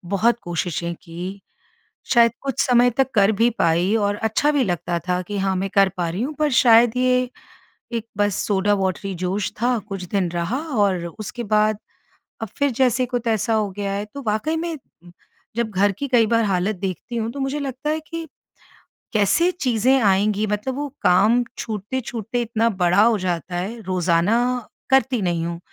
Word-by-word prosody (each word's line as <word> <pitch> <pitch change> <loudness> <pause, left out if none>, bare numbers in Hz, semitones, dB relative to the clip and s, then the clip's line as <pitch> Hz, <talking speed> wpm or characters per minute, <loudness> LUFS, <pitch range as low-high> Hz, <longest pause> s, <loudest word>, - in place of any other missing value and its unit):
बहुत 235 +4 +2
कोशिशें 170 0 -3
कीं, 180 +4 -7 0.8
शायद 235 -1 +6
कुछ 275 -2 -2
समय 245 0 +4
तक 265 +3 0
कर 205 -1 +4
भी 235 +1 +5
पाई 170 +5 +2
और 205 -1 0
अच्छा 220 +7 +1
भी 285 -2 +2
लगता 175 -2 -2
था 180 0 +1
कि, 205 +3 -5
"हाँ, 195 0 0
मैं 195 +1 -2
कर 195 -1 +5
पा 175 -2 -1
रही 180 +6 -3
हूँ।" 290 +5 -3
पर 305 -1 +2
शायद 235 0 +5
ये 250 0 +2 0.6
एक 230 -1 -3
बस 205 -1 +2
सोडा 205 0 +2
वॉटरी 195 0 -2
जोश 190 +2 -1
था। 245 0 +2
कुछ 195 -2 -5
दिन 190 -3 0
रहा, 175 +9 -2
और 205 - 0
उसके 225 +3 -6
बाद 215 0 +2 0.6
अब 225 - -3
फिर 285 0 +2
जैसे 255 -1 +3
को 245 0 -1
तैसा 225 -1 0
हो 215 -2 0
गया 200 0 -3
है। 200 +1 -2
तो 280 - -6
वाक़ई 220 +10 0
में 330 0 -3 0.8
जब 235 -2 -1
घर 200 0 +2
की 280 - -3
कई 240 -4 +4
बार 230 +1 +2
हालत 195 +1 0
देखती 190 +5 -5
हूँ, 225 0 -1
तो 280 - -6
मुझे 270 +2 -1
लगता 275 +2 -3
है 310 +1 -1
कि 330 +1 -7 0.9
कैसे 215 - +3
चीज़ें 260 - +2
आएँगी? 205 +1 +2
मतलब 210 +5 -2
वो 290 +1 -3 0.2
काम 210 +7 +4
छूटते-छूटते 225 +2 -4
इतना 230 0 +1
बड़ा 180 -2 +2
हो 230 -1 +4
जाता 180 -1 -3
है। 200 +7 -4
रोज़ाना 180 +1 +1 0.5
करती 265 -3 +3
नहीं 170 -2 0
हूँ, 170 0 -4
215 Hz, 180 wpm, -22 LUFS, 190-245 Hz, 0.9 s, शायद